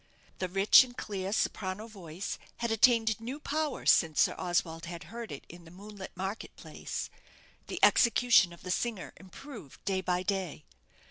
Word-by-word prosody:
The 185 - -2
rich 195 +7 +7
and 245 -1 -12
clear 195 -2 -4
soprano 200 -1 -1
voice 190 -5 -7 0.2
had 235 -1 -2
attained 225 -1 +4
new 255 +6 -5
power 305 0 -2
since 160 -3 +4
Sir - - +3
Oswald 170 -2 -1
had 170 0 -7
heard 235 -1 -6
it 140 - -8
in 175 0 -12
the 165 - -14
moonlit 195 +1 -10
market 190 +3 -5
place; - - -6 0.6
the - - -5
execution 235 -6 +5
of 170 - -14
the 180 - -4
singer 225 -1 -2
improved 195 - -12
day 190 -1 0
by 180 0 -1
day. 185 -5 -3
195 Hz, 160 wpm, -30 LUFS, 180-225 Hz, 0.6 s, rich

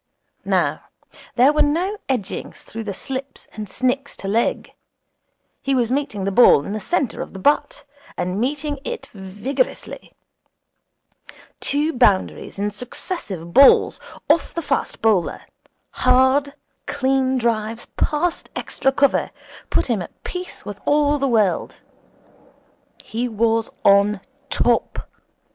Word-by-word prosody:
Now - - 0 0.5
there 260 +4 +5
were 300 - +2
no 345 +8 +1
edgings 240 -8 -3
through 225 0 -7
the 205 - -3
slips 265 +6 -6
and 210 -2 -7
snicks 260 +4 -1
to 195 - -7
leg. 225 +4 0 0.9
He 275 0 0
was 245 -2 +1
meeting 270 -7 -1
the 195 - 0
ball 190 -9 +6
in 200 - -4
the 215 - -2
centre 275 - -1
of - - -7
the - - -7
bat, 290 +9 +1 0.3
and 180 +4 -2
meeting 290 +3 -2
it 480 +6 -5
vigorously. 210 - -4 1.4
Two 300 +3 0
boundaries 210 -8 +1
in 205 +1 -1
successive 205 - -5
balls 275 0 +6 0.3
off 325 +2 +2
the 335 - -2
fast 275 -5 -2
bowler, 210 -6 +2 0.5
hard, 260 +3 +3 0.3
clean 265 0 +1
drives 230 -1 -1
past 325 +3 -1
extra 270 - 0
cover, 280 +1 +2 0.4
put - - +1
him 230 -6 0
at 175 - -11
peace 360 0 -7
with 205 -1 -7
all 290 0 +3
the 275 - +1
world. 215 -6 +1 1.3
He 235 +3 -3
was 225 0 +1 0.2
on 200 +1 +5 0.3
top. 240 -1 0
250 Hz, 125 wpm, -21 LUFS, 210-285 Hz, 1.4 s, ball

